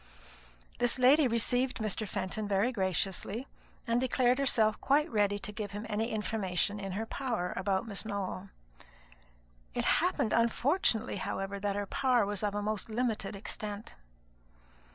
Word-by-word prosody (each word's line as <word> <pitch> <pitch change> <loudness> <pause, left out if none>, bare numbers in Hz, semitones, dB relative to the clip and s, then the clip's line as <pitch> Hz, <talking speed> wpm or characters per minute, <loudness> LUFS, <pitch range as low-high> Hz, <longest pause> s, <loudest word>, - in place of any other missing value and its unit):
This 245 +1 +2
lady 265 +3 +6
received 245 +2 +1
Mr. 215 -1 -2
Fenton 205 +3 -3
very 200 +5 +2
graciously, 195 +3 -1 0.4
and 235 +1 +1
declared 255 0 +2
herself 220 -6 +3
quite 295 +3 +3
ready 205 -2 +2
to 210 - -5
give 210 -1 -5
him 205 +2 -5
any 220 +1 -1
information 210 -2 -1
in 195 -2 -4
her 220 +4 -2
power 225 -7 -2
about 195 +2 0
Miss 200 -3 -2
Nowell. 200 -2 -4 1.3
It - - 0 0.2
happened 215 - +1
unfortunately, 235 - +2
however, 195 +1 -3
that 200 0 -1
her 205 0 -1
power 250 0 +2
was 205 -1 -2
of 205 -1 -1
a 205 - -1
most 215 0 -2
limited 220 -3 -1
extent. 205 +1 -5
215 Hz, 145 wpm, -31 LUFS, 200-240 Hz, 1.3 s, lady